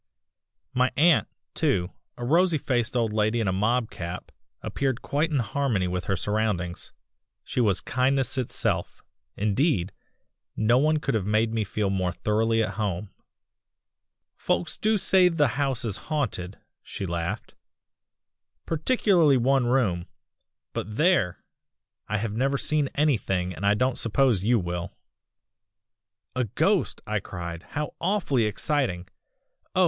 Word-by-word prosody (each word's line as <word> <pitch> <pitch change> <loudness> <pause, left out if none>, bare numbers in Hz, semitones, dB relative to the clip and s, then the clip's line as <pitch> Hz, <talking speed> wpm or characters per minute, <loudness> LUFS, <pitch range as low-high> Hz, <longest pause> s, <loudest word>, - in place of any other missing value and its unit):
"My 125 +1 +2
aunt, 165 +3 +5 0.3
too 100 - 0 0.3
a 120 - -4
rosy 170 +4 +3
faced 120 -3 0
old 115 -3 0
lady 110 +2 +1
in 110 - 0
a 95 - +1
mob 110 +4 +1
cap 85 +1 -6 0.3
appeared 135 -3 -2
quite 150 +4 0
in 150 - 0
harmony 120 -6 0
with 90 0 -3
her 95 - 0
surroundings. 100 -3 -2 0.5
She 125 - -1
was 100 -5 +3
kindness 130 +1 +1
itself 130 -3 -1 0.3
indeed, 105 - +1 0.6
no 120 +3 +3
one 155 +2 +3
could 140 -2 -2
have 105 -4 -1
made 110 +1 +2
me 110 -1 0
feel 100 0 -1
more 95 -2 0
thoroughly 110 +1 +1
at - - -4
home. 100 -1 -2 1.3
"'Folks 85 - -1
do 215 0 +1
say 185 -2 +4
the 150 -6 +2
house 135 -2 -1
is 105 -3 -1
haunted,' 110 - -2 0.2
she 100 - -6
laughed, 85 -1 -4 1.1
'particularly 165 - +3
one 130 +1 +2
room 100 -9 +1 0.7
but 105 - -4
there! 155 - +2 0.6
I 110 - -1
have 105 0 -3
never 135 +4 +1
seen 150 -1 0
anything, 95 -11 +1
and 100 +3 -2
I 105 - +4
don't 125 +3 0
suppose 115 -3 +2
you 120 +3 +3
will.' 90 -2 -4 1.4
"'A 125 -1 +1
ghost!' 105 - 0
I - - -1
cried, 85 -1 -6
'how 150 0 -3
awfully 170 - +1
exciting! 105 -5 -1 0.7
oh! - - +2
115 Hz, 135 wpm, -26 LUFS, 100-140 Hz, 1.4 s, aunt